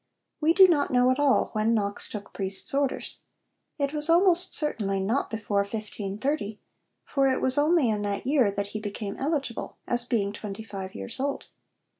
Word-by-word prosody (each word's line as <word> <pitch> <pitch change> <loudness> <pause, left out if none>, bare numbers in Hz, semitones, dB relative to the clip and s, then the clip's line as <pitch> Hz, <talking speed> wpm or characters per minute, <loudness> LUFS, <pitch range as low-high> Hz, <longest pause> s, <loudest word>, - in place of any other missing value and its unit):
We 320 +1 +3
do 380 +1 +8
not 300 -5 +2
know 250 0 +3
at 255 - -1
all 285 -2 +3
when 220 +1 +1
Knox 200 -2 -1
took 205 -1 -8
priest's 195 +4 0
orders. 275 -1 -1 0.6
It 280 -1 -1
was 300 +1 +4
almost 350 +1 +4
certainly 205 - 0
not 215 +8 -1
before 215 -2 -1
1530, 210 +3 -3 0.4
for 275 -1 +1
it 260 - +1
was 260 0 +2
only 300 -1 +3
in 210 -2 0
that 205 +1 -3
year 265 -5 +3
that 200 0 -3
he 215 - -3
became 205 -1 -5
eligible 280 -4 -3
as 240 0 +3
being 210 -5 -1
twenty 210 0 -7
five 195 -3 -7
years 95 - -6
old. 280 +1 -3
230 Hz, 175 wpm, -26 LUFS, 205-285 Hz, 0.6 s, do